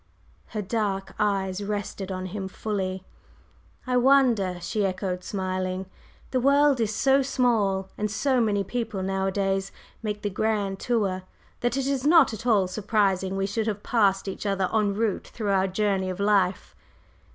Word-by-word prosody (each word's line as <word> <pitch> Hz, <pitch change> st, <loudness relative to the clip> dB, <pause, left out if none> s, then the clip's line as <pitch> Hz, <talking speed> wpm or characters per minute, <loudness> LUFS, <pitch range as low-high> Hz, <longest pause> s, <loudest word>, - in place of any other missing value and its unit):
Her 210 Hz, -1 st, -4 dB
dark 195 Hz, -2 st, -2 dB
eyes 195 Hz, -2 st, 0 dB
rested 200 Hz, -1 st, -4 dB
on 185 Hz, 0 st, -4 dB
him 190 Hz, +1 st, -4 dB
fully. 190 Hz, -2 st, -3 dB, 0.8 s
"I 250 Hz, -1 st, +1 dB
wonder!" 245 Hz, -8 st, +4 dB
she 205 Hz, +4 st, -2 dB
echoed, 185 Hz, -1 st, -2 dB
smiling. 185 Hz, -1 st, -2 dB, 0.5 s
"The 255 Hz, -, +1 dB
world 280 Hz, 0 st, +4 dB
is 215 Hz, -1 st, 0 dB
so 275 Hz, 0 st, +4 dB
small, 225 Hz, -8 st, +1 dB
and 210 Hz, 0 st, 0 dB
so 255 Hz, +4 st, +1 dB
many 205 Hz, -3 st, +1 dB
people 220 Hz, -2 st, -3 dB
nowadays 195 Hz, 0 st, -1 dB, 0.3 s
make 210 Hz, -1 st, -4 dB
the 205 Hz, -, -1 dB
'grand 200 Hz, -1 st, -1 dB
tour,' 200 Hz, -6 st, 0 dB, 0.4 s
that 245 Hz, +2 st, 0 dB
it 270 Hz, -, 0 dB
is 275 Hz, -2 st, -1 dB
not 305 Hz, -4 st, +5 dB
at 225 Hz, +3 st, -6 dB
all 210 Hz, -5 st, +4 dB
surprising 195 Hz, -1 st, 0 dB
we 195 Hz, -, 0 dB
should 215 Hz, +3 st, -2 dB
have 210 Hz, -1 st, -3 dB
passed 200 Hz, -4 st, +2 dB
each 195 Hz, +2 st, -4 dB
other 195 Hz, -2 st, +1 dB
en 210 Hz, -2 st, +2 dB
route 220 Hz, -1 st, -1 dB
through 210 Hz, -3 st, -3 dB
our 190 Hz, 0 st, +3 dB
journey 190 Hz, -1 st, 0 dB
of 185 Hz, +1 st, -5 dB
life." 200 Hz, -2 st, +1 dB
205 Hz, 160 wpm, -26 LUFS, 190-225 Hz, 0.8 s, not